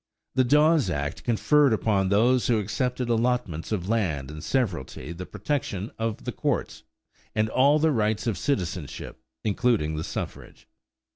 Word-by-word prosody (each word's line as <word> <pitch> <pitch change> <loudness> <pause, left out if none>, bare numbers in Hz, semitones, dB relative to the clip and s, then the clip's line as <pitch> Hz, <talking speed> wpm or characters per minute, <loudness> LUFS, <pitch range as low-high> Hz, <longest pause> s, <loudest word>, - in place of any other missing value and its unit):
The 130 - +3
Dawes 150 - +4
act 70 -1 -3
conferred 140 +4 +3
upon 100 -3 +1
those 120 +5 +3
who 120 - +3
accepted 125 +4 -1
allotments 115 -9 0
of 95 -4 -2
land 80 -12 -1
in 75 0 -8
severalty 90 - -2
the 90 +2 -7
protection 105 -2 -3
of 115 -1 -2
the - - -3
courts - - -2 0.5
and 110 0 +2
all 140 +6 +4
the 160 +1 +3
rights 110 -3 0
of 115 -4 0
citizenship, 90 - -3 0.2
including 105 -8 +1
the 80 - -2
suffrage. - - -7
110 Hz, 145 wpm, -26 LUFS, 90-125 Hz, 0.5 s, Dawes